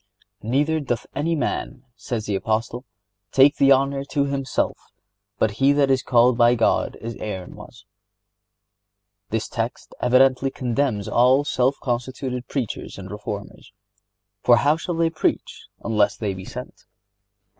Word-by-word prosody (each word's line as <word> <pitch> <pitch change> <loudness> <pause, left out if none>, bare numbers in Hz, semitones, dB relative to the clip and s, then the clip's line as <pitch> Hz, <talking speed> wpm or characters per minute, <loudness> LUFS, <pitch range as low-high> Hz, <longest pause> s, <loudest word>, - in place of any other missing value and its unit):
"Neither 145 +8 +1
doth 125 -5 -3
any 165 +4 0
man," 135 -3 -3
says 115 -4 -4
the 105 - -2
Apostle, 110 +5 -2 0.5
"take 140 +2 +5
the 140 0 +5
honor 135 +1 +3
to 140 0 0
himself, 140 -1 -1 0.6
but 110 - +2
he 140 +1 +5
that 140 -1 +3
is 130 -1 +2
called 120 0 +3
by 120 +1 +5
God, 115 - +1
as 115 +2 -6
Aaron 95 -4 -6
was."(73) 105 -1 -21
This 110 0 -2
text 115 0 -4
evidently 130 +1 +4
condemns 125 -5 -1
all 130 +4 +4
self 135 -1 0
constituted 125 0 -3
preachers 130 -7 -4
and 95 0 -9
reformers; 105 -1 -7 0.7
for, 120 - +5
"how 145 +4 +3
shall 170 +1 -4
they 165 0 +1
preach, 160 - -2 0.2
unless 105 -3 +2
they 105 -3 -2
be 95 0 -9
sent?" - - -9
120 Hz, 140 wpm, -23 LUFS, 105-135 Hz, 0.7 s, take